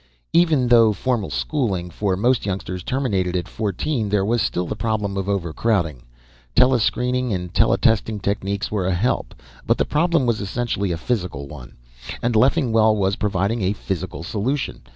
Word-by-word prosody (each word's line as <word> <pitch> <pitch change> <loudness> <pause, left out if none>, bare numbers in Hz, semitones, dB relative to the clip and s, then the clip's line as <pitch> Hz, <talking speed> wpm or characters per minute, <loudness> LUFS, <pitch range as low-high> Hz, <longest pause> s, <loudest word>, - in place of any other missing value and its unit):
Even 160 -7 +3
though 115 -3 +6
formal 115 -1 -1
schooling, 100 - -2
for 95 -1 -1
most 120 +5 +2
youngsters, 95 -2 -4
terminated 95 -7 -1
at 90 - -2
fourteen, 110 - -2
there 100 -1 +1
was 115 +2 +1
still 90 -2 -1
the - - -4
problem 105 -3 -2
of 95 0 -2
overcrowding. 85 - 0 0.5
Telescreening 125 0 +2
and 90 -3 -3
teletesting 110 -1 +2
techniques 100 0 -2
were 100 -4 -1
a 95 - +1
help, 110 +9 -1 0.3
but - - +1
the - - +1
problem 165 -2 +2
was 115 -3 0
essentially 100 -2 -2
a 85 - -1
physical 90 - -3
one. 70 -4 -11 0.4
And 120 0 -1
Leffingwell 115 -4 +4
was 100 -1 +1
providing 105 +3 -1
a 95 +1 +1
physical 85 -6 -5
solution. 110 - -2
105 Hz, 155 wpm, -22 LUFS, 95-120 Hz, 0.5 s, though